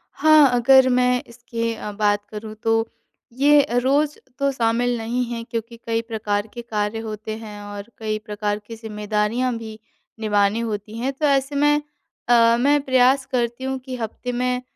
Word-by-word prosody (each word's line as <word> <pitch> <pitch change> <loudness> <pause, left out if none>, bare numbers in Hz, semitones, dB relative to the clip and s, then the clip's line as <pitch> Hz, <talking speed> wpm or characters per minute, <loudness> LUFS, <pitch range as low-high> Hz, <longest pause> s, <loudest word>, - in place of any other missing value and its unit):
हाँ, 310 -3 +6
अगर 260 +2 +6
मैं 250 0 +2
इसकी 230 -1 -4 0.2
बात 205 -1 +1
करूँ 215 0 -7
तो 225 0 +2 0.5
ये 290 +1 +5 0.2
रोज़ 285 +3 +2 0.2
तो 280 0 +2
शामिल 240 -1 +1
नहीं 235 +2 -1
है 230 -1 -4
क्योंकि 230 0 -6
कई 225 0 +1
प्रकार 215 -2 -2
के 240 - -6
कार्य 215 -1 -2
होते 215 -1 -5
हैं 210 -2 -9
और 205 +1 -8
कई 215 -1 -2
प्रकार 210 -1 -2
की 230 - -7
ज़िम्मेदारियाँ 215 +3 -1
भी 220 -1 -9 0.4
निभानी 210 0 +2
होती 215 -1 -4
हैं। 255 +4 -1
तो 300 +3 -2
ऐसे 275 0 +1
में 295 +1 +3 0.5
अ, 235 -1 +5
मैं 285 +3 +4
प्रयास 260 0 +3
करती 240 0 -1
हूँ 265 0 -2
कि 255 0 -7
हफ़्ते 240 +1 -5
में 250 +1 -1
230 Hz, 165 wpm, -22 LUFS, 215-255 Hz, 0.5 s, हाँ